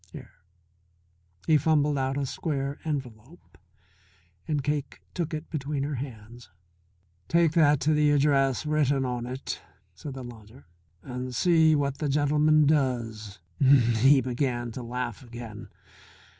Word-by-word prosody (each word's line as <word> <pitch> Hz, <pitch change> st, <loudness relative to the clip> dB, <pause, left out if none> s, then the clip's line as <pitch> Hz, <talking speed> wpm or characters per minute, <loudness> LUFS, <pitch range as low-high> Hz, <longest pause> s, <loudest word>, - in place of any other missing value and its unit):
Here," -, -, -11 dB, 1.1 s
he 155 Hz, -2 st, +4 dB
fumbled 150 Hz, 0 st, +2 dB
out 135 Hz, 0 st, -1 dB
a 140 Hz, -, -1 dB
square 140 Hz, 0 st, -3 dB
envelope 135 Hz, 0 st, -7 dB, 0.9 s
and 150 Hz, -3 st, -1 dB
Cake 145 Hz, -1 st, -3 dB
took 170 Hz, -3 st, -3 dB
it 155 Hz, 0 st, -6 dB
between 145 Hz, -2 st, -3 dB
her 145 Hz, +1 st, -3 dB
hands. 120 Hz, -3 st, -8 dB, 0.8 s
"Take 170 Hz, -2 st, +3 dB
that 150 Hz, -4 st, +4 dB
to 155 Hz, +3 st, +2 dB
the 150 Hz, 0 st, +3 dB
address 140 Hz, -2 st, +2 dB
written 145 Hz, -3 st, +1 dB
on 120 Hz, -1 st, -3 dB
it," 130 Hz, +2 st, -5 dB, 0.3 s
said 135 Hz, +10 st, -8 dB
the 130 Hz, -, -7 dB
lodger, 115 Hz, +1 st, -13 dB, 0.4 s
"and 125 Hz, -1 st, -6 dB
see 160 Hz, 0 st, +4 dB
what 140 Hz, -2 st, -1 dB
the 150 Hz, -, -1 dB
gentleman 150 Hz, +2 st, +3 dB
does." 120 Hz, -8 st, -1 dB, 0.2 s
He 130 Hz, 0 st, +5 dB
began 120 Hz, -1 st, -2 dB
to 125 Hz, -, -7 dB
laugh 120 Hz, -1 st, -4 dB
again. 115 Hz, -3 st, -9 dB
135 Hz, 130 wpm, -27 LUFS, 120-150 Hz, 1.1 s, He